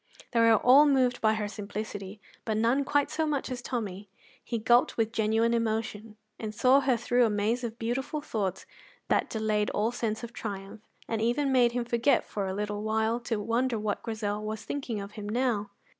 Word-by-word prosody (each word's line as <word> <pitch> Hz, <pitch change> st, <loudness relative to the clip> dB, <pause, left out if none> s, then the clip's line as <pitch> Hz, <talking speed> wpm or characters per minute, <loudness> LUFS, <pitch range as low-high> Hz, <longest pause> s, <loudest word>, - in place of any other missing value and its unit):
They 235 Hz, -, +1 dB
were 230 Hz, -1 st, +6 dB
all 265 Hz, +7 st, +6 dB
moved 255 Hz, -3 st, +2 dB
by 220 Hz, 0 st, +3 dB
her 210 Hz, -1 st, -2 dB
simplicity, 205 Hz, 0 st, -6 dB, 0.2 s
but 220 Hz, -1 st, -1 dB
none 235 Hz, +5 st, +2 dB
quite 290 Hz, +1 st, +1 dB
so 315 Hz, -1 st, 0 dB
much 285 Hz, -3 st, -2 dB
as 245 Hz, -1 st, -4 dB
Tommy. 205 Hz, -6 st, -4 dB, 0.3 s
He 235 Hz, -, -3 dB
gulped 240 Hz, +3 st, +3 dB
with 225 Hz, -1 st, +1 dB
genuine 225 Hz, +1 st, +2 dB
emotion, 220 Hz, -1 st, -2 dB, 0.2 s
and 215 Hz, -1 st, -5 dB
saw 260 Hz, +5 st, +5 dB
her 265 Hz, -3 st, +2 dB
through 245 Hz, +1 st, +2 dB
a 230 Hz, -, +3 dB
maze 215 Hz, +4 st, 0 dB
of 230 Hz, -1 st, -4 dB
beautiful 260 Hz, +6 st, -2 dB
thoughts 205 Hz, -, -3 dB, 0.4 s
that -, -, +2 dB
delayed 215 Hz, -1 st, 0 dB
all 215 Hz, +3 st, 0 dB
sense 225 Hz, -2 st, -3 dB
of 235 Hz, 0 st, -7 dB
triumph 200 Hz, -1 st, -6 dB, 0.3 s
and 225 Hz, -1 st, -2 dB
even 260 Hz, +5 st, +1 dB
made 245 Hz, -2 st, +4 dB
him 245 Hz, -1 st, -1 dB
forget, 240 Hz, +3 st, +2 dB
for 200 Hz, -2 st, -3 dB
a 190 Hz, -, -2 dB
little 205 Hz, 0 st, -3 dB
while, 220 Hz, +2 st, 0 dB
to 230 Hz, -2 st, -2 dB
wonder 230 Hz, +3 st, 0 dB
what 210 Hz, -1 st, -2 dB
Grizel 215 Hz, -2 st, -3 dB
was 215 Hz, 0 st, -5 dB
thinking 255 Hz, -7 st, -3 dB
of 200 Hz, 0 st, -7 dB
him 210 Hz, -1 st, -7 dB
now. 225 Hz, -3 st, 0 dB
225 Hz, 195 wpm, -28 LUFS, 210-245 Hz, 0.4 s, were